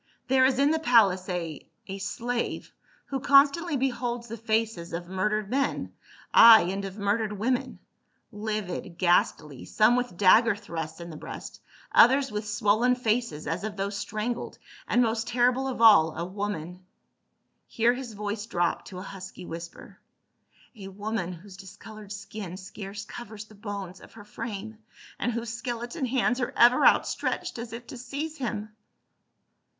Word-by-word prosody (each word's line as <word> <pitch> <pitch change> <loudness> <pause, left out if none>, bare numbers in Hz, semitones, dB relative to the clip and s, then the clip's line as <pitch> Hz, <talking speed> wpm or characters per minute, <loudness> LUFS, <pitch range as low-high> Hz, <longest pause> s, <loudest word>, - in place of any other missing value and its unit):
There 260 0 +5
is 260 -1 +2
in 280 +2 +4
the 320 - +1
palace 205 - +3
a 170 -4 -4
— - - -47
a 195 0 -6
slave 235 +5 -3 0.3
who 270 - -3
constantly 285 +4 +4
beholds 245 -2 -2
the 230 - -6
faces 220 -6 -2
of 170 +1 -4
murdered 205 +3 -1
men, 275 +1 -1 0.4
ay, 230 -1 +10
and 195 +1 -4
of 195 +1 -7
murdered 210 +1 0
women 250 +5 -1 0.3
— - - -46 0.2
livid, 190 -5 -4
ghastly, 160 -5 +1
some 215 +3 +3
with 245 -7 -2
dagger 205 +3 +5
thrusts 165 -5 -6
in 170 0 -8
the 155 - -9
breast, - - -9 0.3
others 270 +2 +5
with 210 0 -4
swollen 220 +3 +2
faces 230 -9 -1
as 165 - -3
of 215 -1 -5
those 200 +1 -2
strangled, 215 +4 -4 0.3
and 245 - +3
most 225 0 -1
terrible 250 +2 +2
of 255 -3 -4
all, 160 -8 +7
a 170 - -2
woman 185 -2 -5 0.3
— - - -50
" - - -49
here 235 +1 +2
his 250 -3 -7
voice 210 +1 -4
dropped 175 -5 -1
to 185 - -9
a 185 - -6
husky 190 -2 -9
whisper, 170 0 -9 0.8
"a 200 -3 -9
woman 200 -1 -4
whose 185 +2 -11
discolored 210 +2 -12
skin 200 -3 -7
scarce 200 +1 -8
covers 215 -1 -9
the 215 - -18
bones 200 -3 -7
of - - -15
her 205 -2 -12
frame, 220 0 -7 0.4
and 240 - 0
whose 230 0 -4
skeleton 240 +4 -4
hands 250 0 +1
are 250 - -3
ever 245 +1 +6
outstretched - - 0
as 235 0 -6
if 235 +1 -8
to 250 - -9
seize 285 +6 -5
him 215 -4 -4
215 Hz, 165 wpm, -27 LUFS, 195-240 Hz, 0.8 s, ay